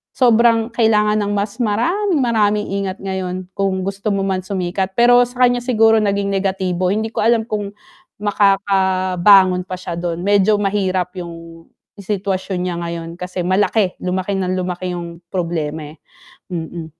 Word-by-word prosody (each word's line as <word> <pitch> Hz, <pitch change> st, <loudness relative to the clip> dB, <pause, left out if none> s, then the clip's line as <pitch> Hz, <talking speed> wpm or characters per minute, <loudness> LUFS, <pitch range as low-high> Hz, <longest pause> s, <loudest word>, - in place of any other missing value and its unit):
sobrang 235 Hz, -2 st, +3 dB
kailangan 215 Hz, -2 st, +2 dB
ng 205 Hz, 0 st, -1 dB
mas 205 Hz, +4 st, -3 dB
maraming-maraming 235 Hz, -, +1 dB, 0.2 s
ingat 190 Hz, 0 st, -4 dB
ngayon 185 Hz, -1 st, -3 dB
kung 190 Hz, -1 st, -1 dB
gusto 195 Hz, +2 st, -4 dB
mo 195 Hz, -, -1 dB
man 190 Hz, -1 st, -1 dB
sumikat 185 Hz, 0 st, -3 dB
pero 245 Hz, +1 st, +6 dB
sa 250 Hz, +1 st, -1 dB
kanya 245 Hz, 0 st, +4 dB
siguro 225 Hz, -3 st, +3 dB
naging 200 Hz, -1 st, 0 dB
negatibo, 190 Hz, -2 st, -1 dB
hindi 220 Hz, +3 st, -1 dB
ko -, -, -4 dB
alam 225 Hz, +1 st, +3 dB
kung 205 Hz, -2 st, -4 dB, 0.5 s
makakabangon 190 Hz, -2 st, +3 dB
pa 185 Hz, -, -4 dB
siya 175 Hz, -2 st, -6 dB
dun, 175 Hz, 0 st, -3 dB
medyo 205 Hz, +1 st, +3 dB
mahirap 190 Hz, -3 st, -1 dB
yung 165 Hz, -1 st, -10 dB, 0.3 s
sitwasyon 195 Hz, -2 st, -3 dB
niya 180 Hz, -1 st, -2 dB
ngayon 170 Hz, -1 st, -5 dB
kasi 180 Hz, +1 st, -6 dB
malaki, 190 Hz, +1 st, +1 dB
lumaki 185 Hz, +2 st, -1 dB
ng 185 Hz, -1 st, -1 dB
lumaki 180 Hz, 0 st, -3 dB
yung 170 Hz, -1 st, -7 dB
problema 165 Hz, -4 st, -2 dB, 0.2 s
eh. -, -, -34 dB, 0.6 s
Mm. 165 Hz, 0 st, -5 dB
195 Hz, 145 wpm, -18 LUFS, 180-210 Hz, 0.6 s, pero